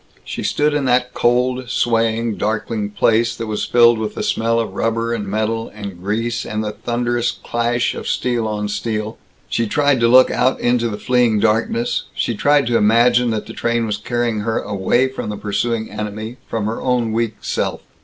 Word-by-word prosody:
She - - -5
stood 150 0 +1
in 145 -2 0
that 125 0 +2
cold, 125 +1 +1
swaying, 115 -2 +1
darkling 105 -1 -2
place 115 +2 +2
that 115 - -5
was 110 -1 -2
filled 120 -1 +5
with 110 -1 -3
the 215 - -3
smell 115 - +1
of 110 -4 -3
rubber 115 +2 -1
and 105 -3 -3
metal 110 +2 -1
and 100 -4 -8
grease 115 +4 -1
and 110 0 -3
the 105 - -2
thunderous 120 +1 -1
clash 120 0 -1
of - - -7
steel 120 -3 0
on 105 -1 -2
steel; 110 +1 -3 0.3
she 115 - -1
tried 145 +2 +2
to 115 - +4
look 130 +2 +6
out 130 +1 +1
into 120 -1 +1
the 105 - -4
fleeing 125 -2 +2
darkness; 115 - 0
she 120 - -1
tried 145 +4 +3
to 115 0 +2
imagine 120 +3 +4
that 110 -2 -2
the - - -9
train 115 0 0
was 105 -2 -2
carrying 120 0 -1
her 110 +2 -1
away 105 +6 +1
from 130 -4 -5
the 105 - -4
pursuing 110 +2 -2
enemy 110 +3 -5
from 110 -2 -2
her 110 +2 -3
own 125 -3 0
weak 115 -1 -1
self. - - -2
115 Hz, 190 wpm, -19 LUFS, 110-120 Hz, 0.3 s, look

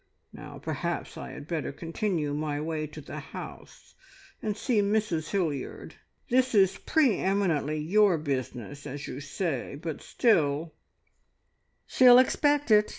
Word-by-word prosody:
Now - - -10
perhaps - - -4
I - - -7
had 145 - -9
better 165 -5 -2
continue 165 -1 -2
my 150 0 -2
way 155 0 -3
to 155 - -10
the - - -7
house - - -10 0.5
and 210 -1 -2
see 225 -2 +1
Mrs 200 -6 0
Hilliard. 160 -9 -3 0.4
This 255 -1 +3
is 190 -2 +4
pre 280 - +2
eminently 170 -7 +1
your 185 +4 +3
business, 140 -1 -4
as 140 +1 -6
you 130 - -6
say, 145 -2 -3
but 155 0 -6
still 160 - +1 0.5
" - - -47
"She'll 250 -1 +7
expect 290 +1 +3
it! 210 0 +5
165 Hz, 140 wpm, -28 LUFS, 145-210 Hz, 0.5 s, She'll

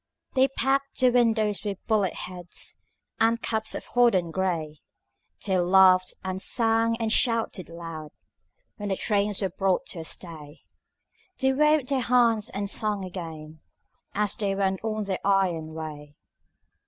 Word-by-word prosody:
They 265 0 +4
packed 275 +1 -1
the 255 -1 +5
windows 225 -4 +2
with 200 -3 -3
bullet 205 -5 +1
heads 180 -1 -6 0.4
And 230 +1 +3
caps 220 -1 -2
of - - -6
hodden 215 -9 +3
gray; 165 -5 -2 0.7
They 190 -3 +1
laughed 185 0 +5
and 190 0 -3
sang 230 0 +2
and 225 -1 0
shouted 230 -7 +1
loud 165 -2 -8 0.7
When 205 -2 -5
the 195 - 0
trains 205 -1 0
were 190 - -1
brought 190 -2 0
to 170 - -4
a - - -5
stay; 160 -3 -3 0.8
They 265 0 +2
waved 300 -1 +2
their 275 -2 +1
hands 230 -3 +3
and 200 +1 -4
sang 210 -1 0
again 160 -4 -8 0.5
As 205 0 +1
they 200 -2 -1
went 195 0 -1
on 215 -1 -2
their 195 -2 -3
iron 180 -5 0
way. 150 -2 -8
200 Hz, 145 wpm, -26 LUFS, 175-225 Hz, 0.8 s, the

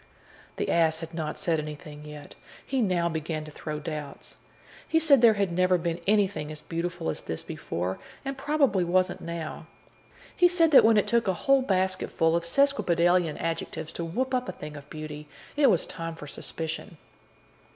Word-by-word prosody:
The - - -2
ass 165 -1 +2
had 165 0 -7
not 160 -2 -3
said 170 -5 +1
anything 150 0 -7
as 150 - -11
yet; 150 -1 -10 0.3
he 265 -1 0
now 180 -5 +1
began 160 -1 -3
to 155 - -10
throw 150 0 -5
doubts. 150 -2 -7 0.5
He 320 - +3
said 290 -6 +5
there 230 -3 +7
had 200 -3 0
never 185 +1 +3
been 170 0 -2
anything 200 -7 +1
as 155 - -8
beautiful 170 +1 -4
as - - -6
this 80 - -5
before, 90 +3 -4 0.3
and 275 0 -3
probably 270 -8 +2
wasn't 180 +1 +1
now. 165 -1 -6 0.7
He 355 - +6
said 340 -2 +3
that 280 - +9
when 220 -1 +5
it 210 - +3
took 235 -2 +1
a 190 - +2
whole 275 -1 +5
basketful 185 -6 +1
of 170 0 -1
sesquipedalian 175 - +2
adjectives 165 -1 -4
to 170 - -4
whoop 255 +11 -2
up 250 0 0
a - - -4
thing 150 0 -8
of 145 0 -11
beauty, 150 -1 -7 0.3
it 285 -2 +5
was 185 -6 +2
time 165 0 -6
for 155 - -9
suspicion. 160 +4 -5
170 Hz, 185 wpm, -27 LUFS, 155-210 Hz, 0.7 s, that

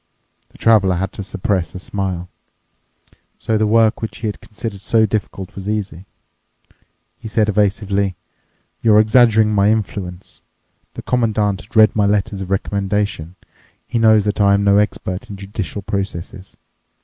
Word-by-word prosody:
The - - -19
Traveler 100 -5 +3
had 95 +3 -3
to - - -7
suppress 95 -3 -2
a - - -5
smile. 95 -2 -4 1.1
So 110 - -1
the 110 0 +2
work 115 +1 +3
which 110 - -5
he 115 - -6
had 105 - -5
considered 105 -2 -7
so 110 +3 +3
difficult 100 -2 -4
was 100 +1 -6
easy. 100 -4 -4 1.1
He - - -8
said 110 -1 +1
evasively, 100 -1 0 0.7
"You're 110 -2 +5
exaggerating 110 -1 +4
my 100 0 +3
influence. 95 -4 -3 0.5
The - - -7
Commandant 110 -5 0
has 100 - -20
read 110 -1 +6
my 105 -2 +2
letters 100 0 0
of 95 - -6
recommendation. 100 -3 -2 0.5
He 120 - -2
knows 110 -2 +5
that 105 0 -1
I 100 0 +5
am 100 - 0
no 100 0 +4
expert 95 -3 -2
in 100 - -7
judicial 100 0 -6
processes. 95 -1 -5
100 Hz, 150 wpm, -18 LUFS, 95-110 Hz, 1.1 s, read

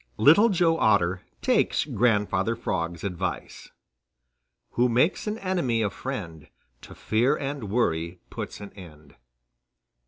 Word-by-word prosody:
_] - - -33
VI - - -4
LITTLE 205 - +7
JOE 170 -4 +2
OTTER 90 -4 +2 0.2
TAKES - - +2
GRANDFATHER 105 -2 +1
FROG'S 85 -7 -3
ADVICE 90 -4 -4 1.0
Who 125 +1 +2
makes 130 - +1
an 210 +1 -2
enemy 175 - 0
a 100 - -1
friend, 85 - -6 0.3
To - - -12
fear 120 +7 +1
and 135 -6 -5
worry 85 -6 -1
puts - - -6
an 100 - -9
end. 75 -6 -14
110 Hz, 130 wpm, -26 LUFS, 90-135 Hz, 1.0 s, LITTLE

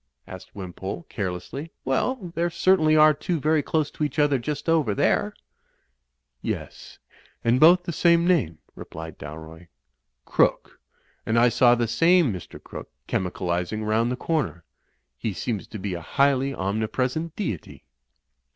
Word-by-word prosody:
asked 95 -1 -11
Wimpole, 95 - -6
carelessly. 100 - -5
"Well, 180 - -1
there 170 +1 0
certainly 170 -2 +3
are 155 0 +7
two 160 +3 -2
very 155 +1 +2
close 150 0 -1
to - - -4
each 145 -1 -2
other 145 -3 +3
just 145 +6 -4
over 155 -11 +2
there." - - +1 1.1
"Yes, - - -6 0.5
and 120 +2 +3
both 175 +4 +7
the 170 - -4
same 170 +2 +4
name," 155 - +1 0.2
replied 80 -1 -9
Dalroy, 80 +3 -10 0.6
"Crooke. - - +1 0.4
And 110 - 0
I 120 +1 +5
saw 120 0 +5
the 120 -1 0
same 165 - +3
Mr. 90 - -9
Crooke - - -10 0.2
chemical 90 -1 -3
izing 90 +5 -2
round 115 +3 +1
the - - -1
comer. 115 - -2 0.6
He 110 - -2
seems 105 +3 -4
to 110 - -8
be 100 -1 -4
a 85 - -5
highly 135 +7 +2
omni 110 -1 -2
present^ 135 +8 -2
deity." 110 - -5
125 Hz, 150 wpm, -24 LUFS, 95-160 Hz, 1.1 s, are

